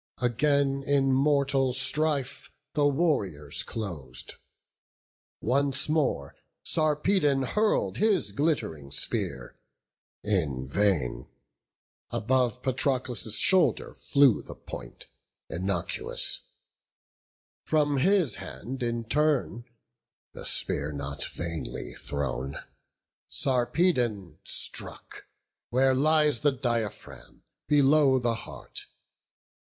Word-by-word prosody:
Again 140 +3 +1
in 135 -1 +2
mortal 140 -1 +2
strife 140 +1 -1 0.2
the 145 -1 +3
warriors 105 - 0
clos'd: 85 - -6 1.1
Once 140 +4 +1
more 145 - 0 0.3
Sarpedon 150 -2 +2
hurl'd 210 - +1
his 210 -3 +2
glitt'ring 140 - -1
spear 70 -2 -3 0.6
In 75 -11 0
vain; 70 -9 0 0.8
above 125 +1 0
Patroclus' 130 -4 0
shoulder 185 -4 +3
flew 140 -6 +3
The - - -10
point, 60 -1 -9 0.5
innocuous; 90 -7 -1 1.2
from 145 -2 +2
his 175 - +3
hand 130 +4 -7
in 120 -1 -1
turn 145 -3 0 0.7
The - - -8
spear 70 +2 +1
not 70 0 -4
vainly 85 -8 -5
thrown, 70 -1 -3 0.7
Sarpedon 120 - +1
struck - - -4 0.4
Where 130 +2 +3
lies 150 -1 +3
the 145 +4 +3
diaphragm, 120 -5 -4 0.2
below 145 -1 +5
the 120 -2 +1
heart. 115 - -7
130 Hz, 85 wpm, -28 LUFS, 95-145 Hz, 1.2 s, below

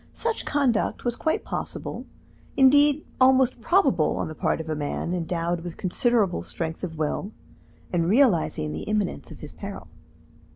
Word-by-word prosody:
Such 460 -1 -2
conduct 265 -7 0
was 240 -1 0
quite 315 - -1
possible, - - -5 0.5
indeed 285 +2 +5 0.2
almost 260 -1 +4
probable 270 - +2
on - - -2
the - - -6
part - - -1
of 160 - -6
a 160 - -1
man, 150 +3 -3
endowed 170 0 -2
with 175 -1 -7
considerable 205 0 +1
strength 165 +1 -5
of 160 -3 -5
will, 155 +6 -2 0.6
and 170 -1 +1
realizing 190 - +2
the 80 - -5
imminence 210 -3 -1
of - - -12
his - - -8
peril. 85 - -8
195 Hz, 155 wpm, -25 LUFS, 165-260 Hz, 0.6 s, indeed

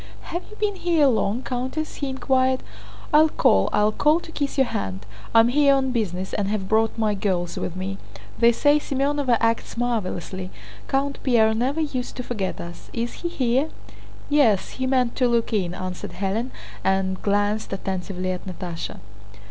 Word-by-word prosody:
"Have 345 - -1
you 425 - -12
been 420 -2 -1
here 335 -5 +3
long, 235 -2 +1
Countess?" 260 +5 -3
he 280 - -2
inquired. 260 -1 +1 0.5
"I'll 310 +1 +7
call, 95 - +3
I'll 210 +1 +3
call 300 +8 +3
to 330 - -11
kiss 285 -3 -2
your 270 - +5
hand. 95 - -4 0.3
I'm 225 +1 +7
here 280 +1 +5
on 265 -1 +1
business 190 -6 -2
and 200 - 0
have 200 -2 -2
brought 220 +2 +2
my 215 -2 +1
girls 185 -4 -1
with 175 - -4
me. 190 +1 -4 0.4
They 235 0 +6
say 290 +5 +4
Semënova 275 -3 +1
acts 230 0 0
marvelously. 190 -6 -2 0.4
Count 275 +1 0
Pierre 225 -4 +4
never 260 +8 0
used 260 -5 -3
to 250 - -4
forget 210 -6 -3
us. 170 0 -9
Is 235 0 -2
he 345 - -1
here?" 265 0 +1 0.6
"Yes, 260 -10 +3
he 260 0 -2
meant 255 -2 +2
to 250 - +3
look 235 -1 +1
in," 180 -4 0
answered 185 -1 -5
Hélène, 205 +6 -1 0.3
and 190 -1 +1
glanced 205 +1 0
attentively 185 -1 -3
at 185 +1 -5
Natásha. 175 - -6
230 Hz, 170 wpm, -24 LUFS, 195-270 Hz, 0.6 s, I'll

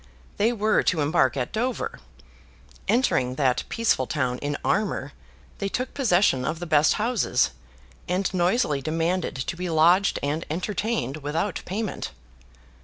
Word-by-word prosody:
They 220 +3 +3
were 215 -2 +2
to 165 -4 +1
embark 145 -3 +2
at 125 -2 -2
Dover. 255 - -2 0.9
Entering 130 - +2
that 130 -3 +2
peaceful 225 - +1
town 125 0 -1
in 145 0 -2
armour, 190 -9 0 0.5
they 200 - -1
took 255 +5 -3
possession 185 - +3
of 160 - -2
the 175 - -5
best 155 -2 +4
houses, 215 - +1 0.6
and 185 +1 0
noisily 175 - +1
demanded 165 +4 -1
to 130 +6 -3
be 180 +1 -4
lodged 170 +5 +4
and 150 +3 -1
entertained 180 - -2
without 160 +6 -2
payment. 205 - -3
175 Hz, 135 wpm, -25 LUFS, 145-210 Hz, 0.9 s, best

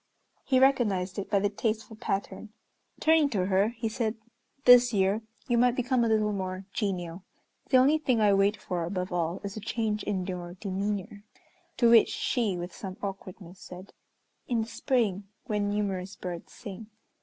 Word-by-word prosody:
He 260 -1 +3
recognized 210 -8 +2
it 195 - -5
by 205 - +2
the 205 +1 +2
tasteful 220 +1 -2
pattern. 200 +1 -4 0.5
Turning 315 -2 +4
to 195 -8 0
her 195 +2 +3
he 230 -1 -4
said, 220 0 -2 0.5
"This 245 -1 +8
year 195 +2 +2 0.3
you 240 -2 +2
might 245 0 +4
become 250 -1 +1
a - - +2
little 215 -1 +2
more 185 -1 -4
genial, 180 -4 -3 0.5
the 260 - +5
only 280 +5 +4
thing 255 -6 +1
I 210 -2 +4
wait 195 +2 +3
for 175 -2 -3
above 180 +1 -3
all 170 0 -1
is 200 -1 -5
a - - -4
change 215 -1 -2
in 190 -3 -2
your 180 -1 -6
demeanor." 200 +1 -4 0.5
To 235 -2 +5
which 230 -2 +7
she, 220 -7 -1
with 175 0 -6
some 190 -1 -7
awkwardness, 190 -2 -7
said, 185 +1 -11 0.5
"In 235 -2 +1
the - - -8
spring, 220 -6 0 0.2
when 210 -4 -1
numerous 195 -2 -2
birds 175 -2 -7
sing." 210 -1 -9
205 Hz, 170 wpm, -28 LUFS, 185-230 Hz, 0.5 s, This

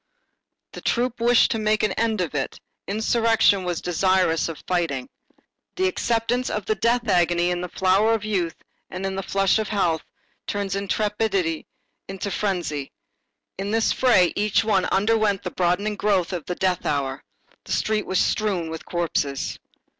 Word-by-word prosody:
The - - -9
troop 245 0 0
wished 240 0 +4
to 225 - 0
make 215 0 +1
an 210 - +2
end 220 -1 0
of 170 -4 -3
it, 135 -2 -3 0.3
insurrection 220 -1 +3
was 175 -2 -2
desirous 180 -2 +2
of 160 - -8
fighting. 165 -8 -1 0.7
The 375 0 +1
acceptance 245 -6 0
of 210 - -3
the 215 - +1
death 235 +3 +1
agony 175 -2 +2
in 175 0 -2
the 180 - -4
flower 195 +6 +3
of 215 -1 -4
youth 180 -6 -1 0.3
and 185 +1 -5
in 190 0 -2
the 195 - -2
flush 195 +2 +2
of 215 - -2
health 170 -7 0 0.5
turns 200 -1 -2
intrepidity 200 -4 -1 0.4
into 195 +1 -5
frenzy. 175 -8 -2 0.7
In 195 +1 -2
this 225 +1 +2
fray, 230 -9 +4
each 210 +1 +2
one 200 -4 +2
underwent 205 -1 +1
the 180 - -4
broadening 185 +4 0
growth 195 -4 +1
of 170 -4 -4
the 180 - -3
death 185 -1 0
hour. 140 -1 -2 0.4
The - - -9
street 215 -1 0
was 185 - 0
strewn 185 -7 0
with 160 - -7
corpses. 150 -5 -2
195 Hz, 160 wpm, -23 LUFS, 175-215 Hz, 0.7 s, wished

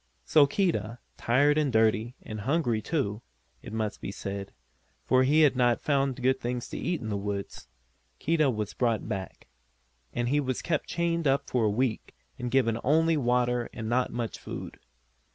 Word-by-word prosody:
So 150 -3 +5
Keedah, 150 - 0 0.2
tired 145 +5 +3
and 145 -3 +1
dirty, 110 +1 +2
and 110 -1 -6
hungry 125 -3 +1
too, 110 -6 -2 0.4
it - - -9
must 110 -1 -3
be - - -4
said 100 0 -5 0.5
for 130 0 +4
he 145 +4 +4
had 145 -4 +5
not 120 -2 +3
found 135 -3 0
good 130 +1 +3
things 120 0 -3
to - - -5
eat 175 -1 -2
in 110 - -4
the 105 - -1
woods 100 0 -5 0.5
Keedah 155 -2 +2
was 105 -4 -3
brought 115 -4 0
back. 95 -4 -5 0.7
And 120 0 -1
he 145 +2 +2
was 130 -3 -2
kept 160 -3 -1
chained 170 -2 0
up 135 +1 +1
for 120 -3 +2
a - - +3
week, 115 +2 -1 0.2
and 125 - -3
given 120 -3 +2
only 160 +4 +3
water 125 -3 +1
and 110 - -5
not 125 +1 +1
much 120 -2 -4
food. - - -7
125 Hz, 175 wpm, -28 LUFS, 110-145 Hz, 0.7 s, So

